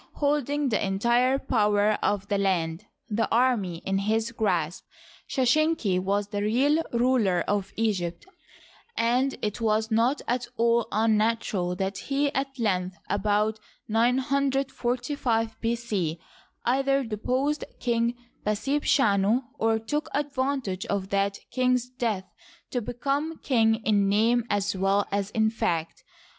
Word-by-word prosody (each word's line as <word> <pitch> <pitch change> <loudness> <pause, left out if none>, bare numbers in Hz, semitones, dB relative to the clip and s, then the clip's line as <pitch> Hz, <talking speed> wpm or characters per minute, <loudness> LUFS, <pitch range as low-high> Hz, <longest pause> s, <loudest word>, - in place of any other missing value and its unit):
Holding 290 -1 0
the 215 - 0
entire 235 +7 +2
power 210 -5 +2
of 205 -1 0
the 200 -1 0
land, 170 -4 0 0.2
the 225 0 0
army, 225 -9 +1
in 195 0 0
his 220 +3 0
grasp, 180 -8 -1 0.5
Sheshenq 260 - +2
was 200 +2 -1
the 205 -1 -2
real 265 +9 +2
ruler 235 -7 +2
of 200 -1 -1
Egypt, 190 - -1 0.7
and 250 +4 +1
it 210 +2 -2
was 220 0 +1
not 235 +6 +2
at 245 0 -1
all 235 0 +2
unnatural 215 -4 +1
that 195 +1 -3
he 280 +4 -1
at 270 0 -2
length, 185 -5 -1
about 210 +2 +1 0.3
945 250 -1 0
B. 230 +1 +1
C, 195 -9 -2 0.5
either 275 +2 +2
deposed 255 +7 -1 0.2
King 235 0 0 0.3
Pasebchanu 220 -1 +2 0.2
or 225 0 +2
took 295 +8 -3
advantage 265 -8 -2
of 195 -1 -2
that 200 0 0
king's 250 -1 +1
death 230 -6 -2 0.5
to 245 - -1
become 280 +7 -2
king 225 -5 +3
in 205 -2 +3
name 225 +3 +3
as 200 -1 0
well 195 +2 +2
as 200 0 -1
in 220 0 +1
fact. 165 -7 -2
225 Hz, 125 wpm, -26 LUFS, 200-255 Hz, 0.7 s, king